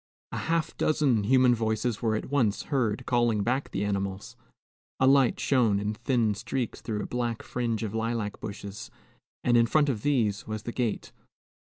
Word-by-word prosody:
A -, -, -4 dB
half 165 Hz, -1 st, -1 dB
dozen 135 Hz, -9 st, +2 dB
human 130 Hz, +1 st, +5 dB
voices 110 Hz, 0 st, -1 dB
were 110 Hz, -2 st, +1 dB
at 110 Hz, -, -4 dB
once 120 Hz, -8 st, +1 dB
heard 125 Hz, -2 st, 0 dB
calling 120 Hz, -4 st, +2 dB
back 130 Hz, +5 st, -1 dB
the 100 Hz, +2 st, -2 dB
animals. 100 Hz, -1 st, -3 dB, 0.6 s
A 130 Hz, -, +4 dB
light 135 Hz, -2 st, +4 dB
shone 115 Hz, -7 st, +2 dB
in 105 Hz, +1 st, -2 dB
thin 115 Hz, -1 st, +1 dB
streaks 120 Hz, +4 st, -4 dB
through 105 Hz, -2 st, -3 dB
a -, -, -4 dB
black 120 Hz, -2 st, -3 dB
fringe 115 Hz, -2 st, -2 dB
of 105 Hz, -2 st, -4 dB
lilac 115 Hz, -2 st, -2 dB
bushes, 100 Hz, -1 st, -7 dB, 0.5 s
and 120 Hz, -, +3 dB
in 115 Hz, 0 st, +5 dB
front 150 Hz, +3 st, +3 dB
of 115 Hz, -6 st, -2 dB
these 115 Hz, -8 st, 0 dB
was 110 Hz, 0 st, -4 dB
the 120 Hz, -, -4 dB
gate. 120 Hz, -3 st, -2 dB
115 Hz, 175 wpm, -28 LUFS, 105-125 Hz, 0.6 s, human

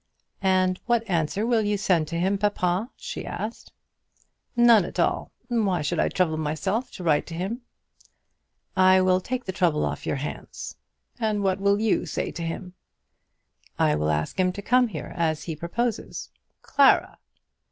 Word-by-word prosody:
"And 185 Hz, -1 st, +2 dB
what 235 Hz, -1 st, +2 dB
answer 175 Hz, +3 st, 0 dB
will 235 Hz, -2 st, +3 dB
you 205 Hz, -1 st, 0 dB
send 175 Hz, -5 st, +2 dB
to 170 Hz, +2 st, -3 dB
him, 195 Hz, +3 st, +1 dB
papa?" 205 Hz, +1 st, 0 dB
she -, -, -6 dB
asked. 225 Hz, +2 st, -6 dB, 0.8 s
"None 235 Hz, -4 st, +6 dB
at 175 Hz, -, -6 dB
all. 170 Hz, -, +1 dB, 0.2 s
Why 205 Hz, -9 st, +1 dB
should 165 Hz, +3 st, -1 dB
I -, -, +2 dB
trouble 165 Hz, -4 st, +1 dB
myself 170 Hz, -, -1 dB
to 185 Hz, -, -8 dB
write 150 Hz, -3 st, +2 dB
to 165 Hz, -, -6 dB
him?" 195 Hz, +9 st, -3 dB, 1.1 s
"I 185 Hz, 0 st, +6 dB
will 185 Hz, 0 st, +3 dB
take 255 Hz, +5 st, -4 dB
the 190 Hz, -, -2 dB
trouble 175 Hz, -5 st, +1 dB
off -, -, -4 dB
your -, -, 0 dB
hands." 140 Hz, +2 st, -6 dB, 0.4 s
"And 215 Hz, -3 st, 0 dB
what 190 Hz, 0 st, +1 dB
will 200 Hz, +1 st, +3 dB
you 220 Hz, -1 st, +1 dB
say -, -, -2 dB
to 170 Hz, -, -7 dB
him?" 170 Hz, +2 st, -5 dB, 1.0 s
"I 75 Hz, -, +3 dB
will 75 Hz, +1 st, 0 dB
ask 75 Hz, -, -1 dB
him 185 Hz, 0 st, +3 dB
to 200 Hz, -, -6 dB
come 250 Hz, +2 st, +4 dB
here, 165 Hz, -10 st, -7 dB
as 160 Hz, -2 st, 0 dB
he 165 Hz, -, -4 dB
proposes." 215 Hz, +9 st, -3 dB, 0.3 s
"Clara!" 280 Hz, -1 st, +4 dB
185 Hz, 165 wpm, -25 LUFS, 170-215 Hz, 1.1 s, None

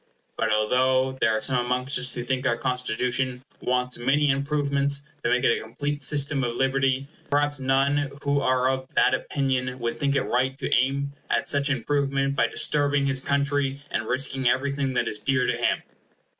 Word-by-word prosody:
But 110 Hz, -1 st, 0 dB
although 130 Hz, +4 st, +2 dB
there 110 Hz, -1 st, +3 dB
are -, -, -4 dB
some 125 Hz, -3 st, +2 dB
amongst 125 Hz, +2 st, -1 dB
us 125 Hz, 0 st, 0 dB
who 120 Hz, -, -3 dB
think 130 Hz, +1 st, -1 dB
our 120 Hz, -2 st, +1 dB
Constitution 125 Hz, 0 st, -1 dB, 0.2 s
wants 125 Hz, 0 st, -1 dB
many 140 Hz, +3 st, +2 dB
improvements 140 Hz, 0 st, 0 dB, 0.2 s
to 120 Hz, -, +1 dB
make 125 Hz, +1 st, +2 dB
it 120 Hz, -, +4 dB
a -, -, -4 dB
complete 145 Hz, +6 st, -4 dB
system 140 Hz, 0 st, +2 dB
of 120 Hz, -1 st, -2 dB
liberty, 135 Hz, +1 st, +1 dB, 0.2 s
perhaps 145 Hz, 0 st, +1 dB
none 135 Hz, +2 st, +1 dB
who 140 Hz, 0 st, +1 dB
are 130 Hz, -1 st, +2 dB
of 130 Hz, 0 st, -1 dB
that -, -, +4 dB
opinion 130 Hz, -2 st, -1 dB
would 120 Hz, -1 st, -3 dB
think 140 Hz, -1 st, +1 dB
it -, -, +2 dB
right 130 Hz, +2 st, 0 dB
to -, -, -2 dB
aim 140 Hz, +3 st, +1 dB, 0.2 s
at -, -, 0 dB
such 140 Hz, 0 st, +1 dB
improvement 140 Hz, +1 st, 0 dB
by -, -, +2 dB
disturbing 145 Hz, -1 st, +2 dB
his 135 Hz, -1 st, +1 dB
country, 140 Hz, 0 st, 0 dB
and 110 Hz, -, -2 dB
risking 135 Hz, -1 st, +1 dB
everything 135 Hz, 0 st, -1 dB
that 120 Hz, -, +1 dB
is 105 Hz, -, -1 dB
dear 130 Hz, +3 st, +1 dB
to -, -, 0 dB
him. -, -, 0 dB
135 Hz, 185 wpm, -25 LUFS, 125-140 Hz, 0.2 s, it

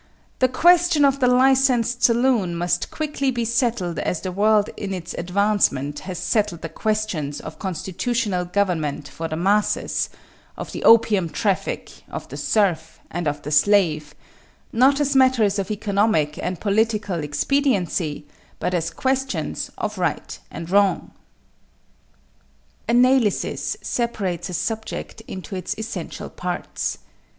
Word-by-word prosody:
the 255 Hz, -, +5 dB
question 335 Hz, +2 st, +4 dB
of 275 Hz, 0 st, +2 dB
the 250 Hz, -, +3 dB
licensed 250 Hz, -2 st, +3 dB
saloon 235 Hz, -7 st, +3 dB
must 175 Hz, 0 st, -1 dB
quickly 300 Hz, -3 st, -2 dB
be 240 Hz, -2 st, -1 dB
settled 230 Hz, -, 0 dB
as 180 Hz, -, -2 dB
the 185 Hz, -, -4 dB
world 210 Hz, +2 st, +3 dB
in 195 Hz, -2 st, -4 dB
its 175 Hz, -2 st, -6 dB
advancement 175 Hz, -7 st, +1 dB
has 185 Hz, -2 st, -6 dB
settled 205 Hz, -7 st, -1 dB
the 165 Hz, -, -4 dB
questions 180 Hz, -7 st, -2 dB
of 160 Hz, -, -9 dB
constitutional 190 Hz, +2 st, -2 dB
government 175 Hz, -6 st, -1 dB
for 165 Hz, -, -5 dB
the 155 Hz, -, -4 dB
masses, 200 Hz, +5 st, +1 dB, 0.5 s
of -, -, -6 dB
the -, -, -6 dB
opium 210 Hz, -6 st, +5 dB
traffic, 200 Hz, +1 st, -2 dB
of -, -, -6 dB
the -, -, -8 dB
serf, 175 Hz, -7 st, 0 dB
and 175 Hz, -1 st, -2 dB
of 145 Hz, 0 st, -2 dB
the 150 Hz, -, -5 dB
slave 155 Hz, -2 st, +3 dB, 0.6 s
not 265 Hz, +4 st, +4 dB
as 285 Hz, -1 st, +1 dB
matters 240 Hz, -7 st, +4 dB
of 195 Hz, -, -3 dB
economic 200 Hz, -7 st, +1 dB
and 180 Hz, -2 st, -3 dB
political 205 Hz, -4 st, 0 dB
expediency 175 Hz, -, 0 dB, 0.3 s
but 180 Hz, -, -1 dB
as 165 Hz, -2 st, 0 dB
questions 265 Hz, +8 st, -2 dB
of -, -, -3 dB
right -, -, -2 dB
and 165 Hz, +1 st, -7 dB
wrong. 200 Hz, -3 st, +2 dB, 1.8 s
=Analysis= 245 Hz, -2 st, +2 dB
separates 195 Hz, -8 st, -2 dB
a 180 Hz, -, -4 dB
subject 220 Hz, +2 st, -4 dB
into 190 Hz, +1 st, -7 dB
its 185 Hz, -, -4 dB
essential 220 Hz, +1 st, -6 dB
parts. -, -, -3 dB
205 Hz, 130 wpm, -22 LUFS, 175-240 Hz, 1.8 s, the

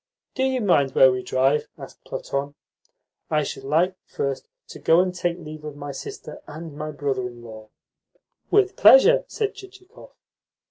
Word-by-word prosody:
"Do 260 Hz, -, -4 dB
you 265 Hz, -1 st, +1 dB
mind 140 Hz, -10 st, +2 dB
where 130 Hz, 0 st, +7 dB
we 125 Hz, 0 st, -2 dB
drive?" 135 Hz, +4 st, +1 dB
asked -, -, -12 dB
Platon. 140 Hz, +1 st, -4 dB, 0.7 s
"I 150 Hz, -1 st, +1 dB
should 135 Hz, -, -6 dB
like 165 Hz, +7 st, +1 dB
first 140 Hz, -1 st, -4 dB, 0.2 s
to -, -, -10 dB
go 165 Hz, +1 st, +4 dB
and 180 Hz, 0 st, +1 dB
take 175 Hz, -1 st, -2 dB
leave 155 Hz, -2 st, -10 dB
of 150 Hz, -1 st, -7 dB
my 145 Hz, 0 st, -6 dB
sister 135 Hz, -, -9 dB
and 155 Hz, 0 st, -9 dB
my 155 Hz, +1 st, -5 dB
brother 140 Hz, -4 st, -2 dB
in 120 Hz, -1 st, -12 dB
law." 110 Hz, -2 st, -11 dB, 0.8 s
"With 405 Hz, -1 st, +3 dB
pleasure," -, -, +7 dB
said 425 Hz, -2 st, -2 dB
Chichikov. 390 Hz, +1 st, -15 dB
150 Hz, 165 wpm, -23 LUFS, 140-195 Hz, 0.8 s, where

